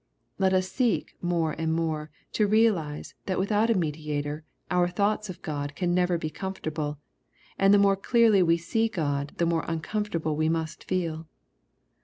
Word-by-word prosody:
Let 190 Hz, -1 st, +3 dB
us 185 Hz, 0 st, +2 dB
seek 245 Hz, +2 st, 0 dB
more 170 Hz, -2 st, 0 dB
and 160 Hz, 0 st, 0 dB
more 155 Hz, -2 st, -2 dB, 0.2 s
to 210 Hz, -, +2 dB
realize 200 Hz, -9 st, +1 dB
that 185 Hz, -, 0 dB
without 210 Hz, +4 st, +2 dB
a 230 Hz, -, +4 dB
mediator 150 Hz, -3 st, -2 dB, 0.3 s
our 180 Hz, -1 st, +3 dB
thoughts 205 Hz, +3 st, 0 dB
of 185 Hz, 0 st, -8 dB
God 145 Hz, -3 st, -4 dB
can 175 Hz, 0 st, 0 dB
never 180 Hz, -1 st, +2 dB
be 155 Hz, -2 st, -4 dB
comfortable, 155 Hz, -6 st, -4 dB, 0.6 s
and 195 Hz, 0 st, +5 dB
the 205 Hz, -, +7 dB
more 200 Hz, -1 st, +5 dB
clearly 220 Hz, 0 st, +4 dB
we 170 Hz, -1 st, +4 dB
see 225 Hz, +7 st, 0 dB
God 145 Hz, -7 st, -2 dB
the 170 Hz, -, +2 dB
more 165 Hz, -1 st, +1 dB
uncomfortable 165 Hz, -1 st, -2 dB
we 155 Hz, +1 st, +1 dB
must 160 Hz, -1 st, -3 dB
feel. 165 Hz, -3 st, -2 dB
175 Hz, 165 wpm, -27 LUFS, 155-195 Hz, 0.6 s, the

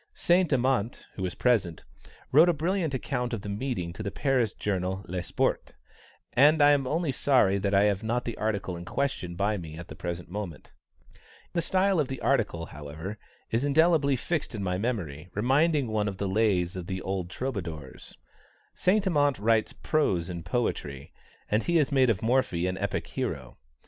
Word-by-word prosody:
Saint 175 Hz, -1 st, +3 dB
Amant, 125 Hz, -4 st, +1 dB
who -, -, -8 dB
was 90 Hz, -1 st, -2 dB
present, 105 Hz, -10 st, +1 dB, 0.5 s
wrote 160 Hz, +6 st, +7 dB
a -, -, +4 dB
brilliant 165 Hz, +1 st, 0 dB
account 125 Hz, -2 st, -2 dB
of 105 Hz, -4 st, -4 dB
the 105 Hz, -, -5 dB
meeting 100 Hz, -5 st, -3 dB
to -, -, -7 dB
the 100 Hz, -, -2 dB
Paris 125 Hz, -3 st, +1 dB
journal 95 Hz, -1 st, -2 dB
Le 90 Hz, +1 st, -3 dB
Sport, -, -, -1 dB, 0.6 s
and 150 Hz, +5 st, +5 dB
I 145 Hz, 0 st, +7 dB
am 140 Hz, -2 st, +2 dB
only 160 Hz, +1 st, 0 dB
sorry 120 Hz, -8 st, +3 dB
that 100 Hz, 0 st, 0 dB
I 100 Hz, -, +5 dB
have 100 Hz, -2 st, +2 dB
not 120 Hz, +2 st, -1 dB
the 115 Hz, -, -3 dB
article 100 Hz, -4 st, -2 dB
in 85 Hz, -, -7 dB
question 90 Hz, -6 st, -2 dB
by 100 Hz, +3 st, 0 dB
me 80 Hz, -3 st, -8 dB
at 85 Hz, 0 st, -9 dB
the -, -, -8 dB
present 85 Hz, 0 st, -5 dB
moment. 90 Hz, -7 st, -7 dB, 0.8 s
The 170 Hz, -, +1 dB
style 190 Hz, +2 st, +2 dB
of 145 Hz, -, +1 dB
the 135 Hz, -1 st, -5 dB
article, 85 Hz, -1 st, 0 dB
however, 80 Hz, +9 st, -8 dB, 0.3 s
is 115 Hz, +3 st, +1 dB
indelibly 145 Hz, -1 st, +4 dB
fixed 150 Hz, 0 st, -2 dB
in 100 Hz, -, -3 dB
my 90 Hz, -1 st, -1 dB
memory, 90 Hz, -, -3 dB
reminding 140 Hz, +6 st, +2 dB
one 110 Hz, -1 st, 0 dB
of 100 Hz, -2 st, -4 dB
the 100 Hz, -, -2 dB
Lays 95 Hz, -4 st, +1 dB
of 90 Hz, -2 st, -6 dB
the 95 Hz, -1 st, -4 dB
old 95 Hz, -2 st, -3 dB
Troubadours. 90 Hz, -, -6 dB, 0.6 s
Saint 200 Hz, +3 st, +2 dB
Amant 145 Hz, -6 st, +2 dB
writes 110 Hz, +1 st, +2 dB
prose 95 Hz, -, 0 dB
in 85 Hz, -1 st, -5 dB
poetry, 70 Hz, -, -3 dB, 0.3 s
and 105 Hz, +2 st, +1 dB
he 175 Hz, -, -1 dB
has 150 Hz, -4 st, +3 dB
made 130 Hz, -3 st, +4 dB
of 110 Hz, -3 st, 0 dB
Morphy 110 Hz, -8 st, +1 dB
an 90 Hz, 0 st, -1 dB
epic 100 Hz, +1 st, -2 dB
hero. 80 Hz, -, -5 dB
110 Hz, 185 wpm, -28 LUFS, 90-140 Hz, 0.8 s, wrote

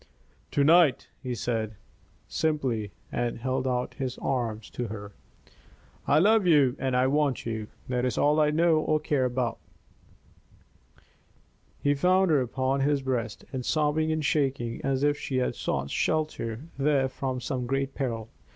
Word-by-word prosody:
"To 145 Hz, -, +2 dB
night," 160 Hz, -1 st, +5 dB
he 125 Hz, -2 st, -3 dB
said, 110 Hz, -3 st, -2 dB, 0.5 s
simply, 130 Hz, -9 st, -1 dB, 0.2 s
and 120 Hz, -1 st, -1 dB
held 130 Hz, +2 st, -1 dB
out 125 Hz, -1 st, -1 dB
his 130 Hz, -2 st, -4 dB
arms 115 Hz, -5 st, -2 dB
to 120 Hz, -, -3 dB
her. 105 Hz, -1 st, -7 dB, 1.0 s
"I -, -, +4 dB
love 205 Hz, +3 st, +4 dB
you 140 Hz, -6 st, +5 dB
and 130 Hz, -1 st, 0 dB
I 125 Hz, -, +3 dB
want 140 Hz, -1 st, +1 dB
you. 110 Hz, -2 st, -3 dB, 0.2 s
That 125 Hz, -1 st, -1 dB
is 125 Hz, -, -1 dB
all 150 Hz, +2 st, +3 dB
I 150 Hz, -1 st, +4 dB
know 160 Hz, +1 st, +3 dB
or 155 Hz, 0 st, +1 dB
care 145 Hz, -3 st, 0 dB
about." 125 Hz, -1 st, -1 dB, 2.2 s
He 145 Hz, -, +4 dB
found 185 Hz, +5 st, +3 dB
her 145 Hz, -3 st, +4 dB
upon 130 Hz, +2 st, -1 dB
his 140 Hz, 0 st, +1 dB
breast, 120 Hz, -5 st, -3 dB, 0.2 s
sobbing 155 Hz, +3 st, +1 dB
and 155 Hz, -1 st, -1 dB
shaking 135 Hz, -5 st, 0 dB
as 135 Hz, 0 st, 0 dB
if 145 Hz, 0 st, +2 dB
she 130 Hz, -, -3 dB
had 125 Hz, -, +1 dB
sought 70 Hz, 0 st, -2 dB
shelter 150 Hz, -7 st, -1 dB, 0.2 s
there 135 Hz, -1 st, +3 dB
from 130 Hz, 0 st, -3 dB
some 125 Hz, 0 st, -3 dB
great 135 Hz, +1 st, -1 dB
peril. 115 Hz, -5 st, -3 dB
130 Hz, 150 wpm, -27 LUFS, 125-150 Hz, 2.2 s, night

